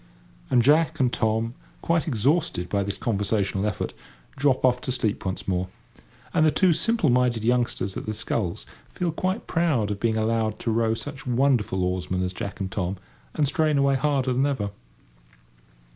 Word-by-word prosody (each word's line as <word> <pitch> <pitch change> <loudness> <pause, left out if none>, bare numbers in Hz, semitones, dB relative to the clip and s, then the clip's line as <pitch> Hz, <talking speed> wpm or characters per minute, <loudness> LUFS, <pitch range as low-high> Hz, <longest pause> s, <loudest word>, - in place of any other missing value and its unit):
And 120 -2 +4
Jack 155 +5 +3
and 125 -2 +2
Tom, 110 +1 0 0.3
quite 170 0 +1
exhausted 130 - +1
by 100 +1 +1
this 100 0 -3
conversational 100 -2 0
effort, 105 - -3 0.4
drop 135 -2 +2
off 125 -1 +3
to - - -2
sleep 120 -5 -1
once 95 - -4
more. 90 -1 0 0.7
And 160 - +3
the 155 - +6
two 180 +3 +3
simple 225 - +2
minded 120 -3 +2
youngsters 120 -5 0
at - - -6
the 110 - -2
sculls 105 -4 -2 0.2
feel 175 -2 -2
quite 185 +6 -2
proud 150 - +1
of 100 - -3
being 110 0 +1
allowed 110 -1 0
to 115 - -1
row 115 0 +1
such 135 +2 -7
wonderful 120 -7 +2
oarsmen 90 0 -1
as 90 0 -2
Jack 100 +2 -6
and 95 -1 -3
Tom, 95 0 -2 0.4
and 150 - +2
strain 155 -1 +1
away 140 0 +3
harder 135 -2 +1
than 135 +3 +2
ever. 105 -8 -2
120 Hz, 175 wpm, -25 LUFS, 100-140 Hz, 0.7 s, the